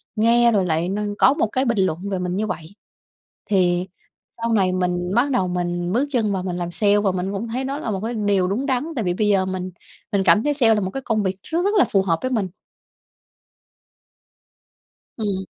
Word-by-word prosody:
nghe 235 +2 +4
rồi 200 -4 +2
lại 165 +1 0
n 205 +1 -2
có 265 - +5
một 290 -7 0
cái 260 +1 +1
bình 235 -3 0
luận 190 +1 -1
về 190 -2 -2
mình 180 0 -2
như 215 +2 -1
vậy. 175 0 -6 0.7
Thì 180 -2 +2 0.5
sau 230 0 0
này 190 -4 +2
mình 180 0 -1
bắt 260 +4 +2
đầu 220 -8 +1
mình 175 0 -2
bước 270 +5 +1
chân 225 -6 +1
vào 185 -1 -2
mình 180 -1 -3
làm 175 -1 -3
sale 205 +2 +3
và 200 -2 +1
mình 185 +1 -3
cũng 205 +4 -3
thấy 245 +4 -3
đó 275 +1 -3
là 230 - -3
một 195 - -2
cái 230 +2 -2
điều 205 -4 +1
đúng 215 +9 -1
đắn, 260 0 0
tại 235 - -1
vì 175 - +1
bây 210 +3 0
giờ 195 -2 +3
mình 185 0 -4 0.4
mình 200 -2 +1
cảm 215 - +5
thấy 295 - +1
sale 235 -6 +4
là 210 - 0
một 190 -1 -3
cái 270 - -5
công 215 -2 0
việc 190 -1 -2
rất 330 - -2
rất 400 - +2
là - - +6
phù 195 - +4
hợp 165 -4 0
với 255 - -2
mình. 215 -6 0 2.7
Ừm. 200 -4 -2
200 Hz, 225 wpm, -22 LUFS, 185-230 Hz, 2.7 s, là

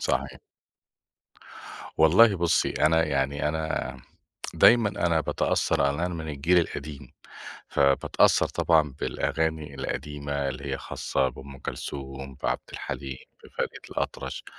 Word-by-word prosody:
صحيح. 65 +1 -1 1.6
والله 95 +7 +6
بُصّي، 85 -1 +2
أنا 80 +2 +3
يعني 70 0 0
أنا 80 -4 -2 0.6
دايمًا 115 -3 +6
أنا 85 -5 +1
باتأثّر - - 0
على 70 +1 +2
إن - - -5
أنا 90 +1 -1
من 80 -2 -5
الجيل 75 +5 +2
القديم، 75 -3 -5 0.6
فباتأثّر 70 -1 +3
طبعًا 75 -4 +2
بالأغاني 80 -3 -2
القديمة 70 +1 -3
اللي 65 -1 -6
هي - - -2
خاصة 65 -1 -1
بأم 65 +2 -11
كلثوم، 70 0 -6
بعبد - - 0
الحليم، 65 -1 -5 0.3
بفريد - - -3 0.2
الأطرش، - - -4
75 Hz, 115 wpm, -26 LUFS, 70-80 Hz, 1.6 s, والله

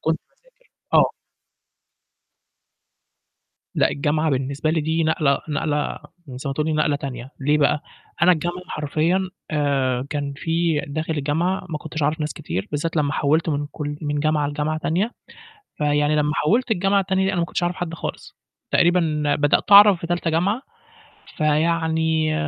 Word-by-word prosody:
كنت - - 0
باذاكر - - -32 0.2
آه. - - +6 2.6
لأ - - +3
الجامعة 155 +2 0
بالنسبة 140 +3 -1
لي 160 0 +1
دي 160 +2 0
نقلة 150 -3 +2
نقلة 150 0 -1 0.3
زي 130 +2 -6
ما - - -1
تقولي 155 +2 0
نقلة 150 -1 +1
تانية، 130 -2 -7
ليه 150 +2 +2
بقى؟ 145 0 +2 0.4
أنا 180 - +7
الجامعة 175 +2 -3
حرفيًا 160 +5 0 0.2
آآ، 135 -4 0
كان 145 -1 -2
في 165 0 0
داخل 155 +3 -3
الجامعة 165 +7 -1
ما 155 - -3
كنتش 160 0 -5
أعرف 150 +3 0
ناس 150 -1 -2
كتير، 95 -5 -5
بالذات 155 +3 -2
لما 145 -2 +1
حوّلت 155 +4 +1
من 145 -1 -1
كل 145 -1 -4
من 145 -1 -1
جامعة 155 -1 +1
لجامعة 150 +2 -2
تانية، 185 +9 -1 0.7
فيعني 150 0 +2
لما 150 0 +1
حوّلت 225 +10 +1
الجامعة 195 0 +2
التانية 190 0 +1
أنا 180 - -1
ما 170 - +1
كنتش 175 - -3
أعرف 175 +1 0
حد 175 -3 -4
خالص. - - -7 0.3
تقريبًا 165 -4 +2
بدأت 145 +6 +1
أعرف 200 -2 +9
في 170 - -4
تالتة 175 -1 -1
جامعة، 195 +10 +1 0.8
فيعني 160 0 +1
155 Hz, 150 wpm, -22 LUFS, 145-170 Hz, 2.6 s, أعرف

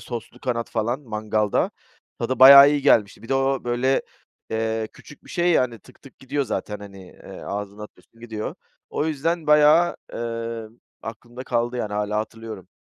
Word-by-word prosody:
soslu 120 -3 -8
kanat 115 -2 -3
falan 120 +4 -1
mangalda... 110 -4 -1 0.5
Tadı 125 +2 -2
bayağı 140 +2 +10
iyi 145 -1 0
gelmişti. 110 -7 +3
Bir 115 - -12
de 135 - +1
o, 135 -1 0
böyle, 120 +2 +1 0.5
eee, 110 0 -1
küçük 150 - -16
bir - - -14
şey, 175 0 +1
yani, 125 -8 +1
tık - - -21
tık 135 - -16
gidiyor 140 +2 -2
zaten, 105 -4 -4
hani, 100 -2 -11
eee, - - -12
ağzına 100 +1 -5
atıyorsun 115 +2 -15
gidiyor. 110 -2 -5 0.4
O 150 - -1
yüzden 160 +2 -1
bayağı, 150 +3 +5 0.2
eee, 115 -1 -4 0.4
aklımda 120 +3 -8
kaldı, 120 0 -1
yani, 105 -4 -3
hâlâ 105 0 -1
hatırlıyorum. 110 -3 -7
120 Hz, 165 wpm, -23 LUFS, 110-135 Hz, 0.5 s, bayağı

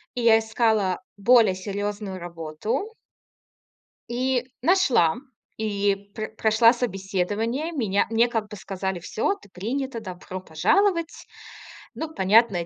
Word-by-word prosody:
И 245 - -2
я 225 -1 +6
искала 220 -4 +1 0.2
более 220 -2 +5
серьезную 200 0 -4
работу 175 - -4 1.2
и 250 +1 0
нашла, 260 - +3 0.4
и 205 -2 +1 0.2
пр 220 0 -5
прошла 225 +2 +5
собеседование. 220 - -2
Меня 210 - +1
мне 230 +2 +4
как 225 -3 -3
бы 210 - -8
сказали: 190 -1 -4
"Всё, 215 - -1
ты 300 - -19
принята. 235 +6 -3
Добро 185 -2 -7
пожаловать!". 335 - +1 0.7
Ну, 320 0 -5
понятное 195 - +3
220 Hz, 115 wpm, -24 LUFS, 190-245 Hz, 1.2 s, я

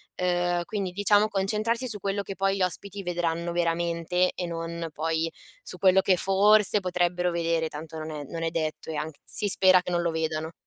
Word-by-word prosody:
ehm, 175 -1 0
quindi 195 -1 -3
diciamo 205 +2 +3
concentrarsi 215 +5 -1
su 215 -3 -1
quello 200 +1 -2
che 195 - -6
poi 195 0 0
gli 195 - 0
ospiti 200 +2 -4
vedranno 170 -1 -2
veramente 170 +1 0
e 180 - -4
non 165 0 -4
poi 160 +1 -1 0.3
su - - -9
quello 190 0 +5
che 190 -1 +3
forse 205 +3 +4
potrebbero 180 -1 0
vedere, 165 -1 0
tanto 160 +1 -8
non 155 0 -6
è 150 -2 -5
non 165 +4 -7
è 165 - 0
detto 160 -2 -3
e 160 - -3
anch 150 0 -4
si 205 - -1
spera 185 -1 +5
che 180 - -4
non 175 0 +1
lo 170 - 0
vedano. 160 0 -2
175 Hz, 195 wpm, -26 LUFS, 165-195 Hz, 0.3 s, quello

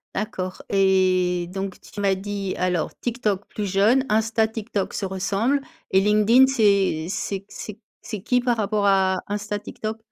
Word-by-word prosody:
D'accord. 190 -3 -4
Et 185 -2 +2
donc 195 -1 -4
tu 205 - -9
m'as 195 -1 +2
dit, 195 0 -4
alors: 180 -3 0
TikTok 215 -5 -1
plus 210 - -4
jeune, 215 +7 +4
Insta, 220 +1 +2
TikTok 220 -2 -4
se 200 - -2
ressemblent 195 +8 0 0.3
et 190 - +5
LinkedIn 215 +6 +5
c'est 200 -10 +2
c'est 195 0 -3
q - - -31
c'est 215 0 -8 0.2
c'est 215 -4 -6
qui, 250 +2 +2
par 245 -1 +1
rapport 210 -1 0
à 190 -1 +3
Insta, 205 0 -3
TikTok? 215 +1 -6
205 Hz, 160 wpm, -23 LUFS, 190-220 Hz, 0.3 s, et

